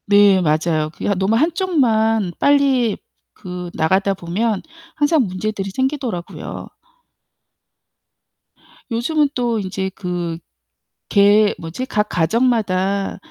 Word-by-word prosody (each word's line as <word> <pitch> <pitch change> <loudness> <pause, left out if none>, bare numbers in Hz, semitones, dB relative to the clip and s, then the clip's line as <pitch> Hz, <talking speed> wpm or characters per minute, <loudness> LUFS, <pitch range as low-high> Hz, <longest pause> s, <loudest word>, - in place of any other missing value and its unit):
네. 200 -2 +5
맞아요. 155 -1 +1
그게 - - -4
너무 190 +4 +1
한쪽만 230 - +1
빨리 270 -6 +3 0.4
그 180 -1 -7
나가다 190 +5 +1
보면 195 +4 -2 0.3
항상 295 -3 +2
문제들이 195 +1 -3
생기더라고요. 260 -9 -3 2.2
요즘은 280 +6 +1
또 240 -3 0
인제 190 -1 -3
그 175 -3 -4 0.7
개 205 +1 +5
뭐지 170 +11 -6
각 210 -3 0
가정마다 195 0 0
205 Hz, 205 characters per minute, -19 LUFS, 185-245 Hz, 2.2 s, 네